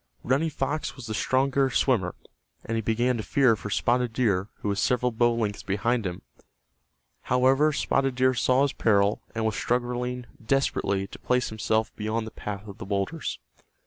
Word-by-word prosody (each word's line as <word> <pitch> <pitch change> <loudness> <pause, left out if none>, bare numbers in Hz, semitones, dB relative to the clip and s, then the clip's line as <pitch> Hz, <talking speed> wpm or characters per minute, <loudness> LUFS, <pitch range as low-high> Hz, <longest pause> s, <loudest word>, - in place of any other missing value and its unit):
Running 140 +6 +1
Fox 145 +1 -2
was 130 - -9
the 110 - -4
stronger 135 +4 +2
swimmer, 110 -11 +1 0.5
and 115 - -2
he 115 - 0
began 120 +3 +1
to - - -2
fear 130 -2 +3
for 105 - -7
Spotted 120 +7 +1
Deer 105 -5 +1
who 105 - 0
was 100 0 -1
several 125 0 +2
bow 120 +1 +2
lengths 105 -3 -2
behind 105 +3 0
him. 90 -1 -6 1.1
However, 130 +4 +4
Spotted 135 -2 0
Deer 130 +1 +3
saw 130 +2 +3
his 140 - 0
peril, 100 -1 +2
and 115 0 -1
was 110 - 0
struggling 125 0 -1 0.2
desperately 110 -6 +1
to - - -11
place 125 0 +1
himself 110 0 -1
beyond 110 +1 -2
the 110 - -8
path 105 0 -6
of 100 - -10
the - - -6
boulders. 100 +10 -2
120 Hz, 175 wpm, -26 LUFS, 105-130 Hz, 1.1 s, However